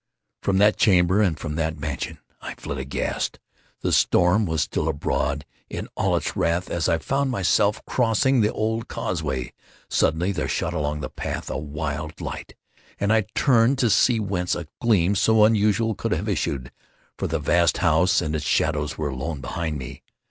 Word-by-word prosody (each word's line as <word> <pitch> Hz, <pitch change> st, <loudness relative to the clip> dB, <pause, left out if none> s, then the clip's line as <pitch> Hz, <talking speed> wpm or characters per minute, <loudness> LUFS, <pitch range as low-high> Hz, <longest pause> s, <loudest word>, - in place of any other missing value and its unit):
From 95 Hz, -1 st, +1 dB
that 105 Hz, +2 st, +4 dB
chamber, 95 Hz, 0 st, +4 dB
and 90 Hz, -7 st, +2 dB
from 75 Hz, -, -5 dB
that 80 Hz, -1 st, -1 dB
mansion, 75 Hz, -3 st, -4 dB, 0.2 s
I -, -, -6 dB
fled 70 Hz, -, -6 dB
aghast. 65 Hz, +1 st, -2 dB, 0.4 s
The -, -, 0 dB
storm 90 Hz, +4 st, +3 dB
was 80 Hz, -2 st, +1 dB
still 75 Hz, -, -2 dB
abroad 75 Hz, -1 st, -1 dB, 0.2 s
in -, -, -5 dB
all -, -, +1 dB
its -, -, -3 dB
wrath 85 Hz, +2 st, 0 dB
as 85 Hz, -1 st, 0 dB
I 85 Hz, -, +3 dB
found 135 Hz, -, -1 dB
myself 100 Hz, -1 st, +1 dB
crossing 125 Hz, +2 st, +2 dB
the 105 Hz, -, +2 dB
old 110 Hz, +1 st, -2 dB
causeway. 65 Hz, -1 st, -3 dB, 0.4 s
Suddenly 85 Hz, +5 st, +2 dB
there 85 Hz, -6 st, -2 dB
shot 80 Hz, -, -1 dB
along 75 Hz, -2 st, -2 dB
the -, -, -4 dB
path -, -, -5 dB
a -, -, -2 dB
wild 75 Hz, +1 st, -5 dB
light, -, -, -6 dB, 0.4 s
and 100 Hz, +2 st, +2 dB
I 110 Hz, -2 st, +2 dB
turned 125 Hz, -1 st, +4 dB
to 120 Hz, -4 st, +2 dB
see 115 Hz, +3 st, +4 dB
whence 95 Hz, -4 st, -1 dB
a 85 Hz, -, -5 dB, 0.2 s
gleam 100 Hz, -6 st, +3 dB
so 110 Hz, +2 st, +4 dB
unusual 110 Hz, +1 st, +2 dB
could -, -, -2 dB
have -, -, -2 dB
issued; 65 Hz, -3 st, -2 dB, 0.5 s
for -, -, -1 dB
the -, -, -1 dB
vast 85 Hz, -3 st, +2 dB
house 85 Hz, +1 st, +3 dB
and 80 Hz, 0 st, -2 dB
its 75 Hz, -, -2 dB
shadows 75 Hz, -1 st, 0 dB
were 75 Hz, -2 st, -2 dB
alone 70 Hz, +3 st, -4 dB
behind 80 Hz, +2 st, -3 dB
me. 65 Hz, -3 st, -8 dB
85 Hz, 175 wpm, -24 LUFS, 75-105 Hz, 0.5 s, that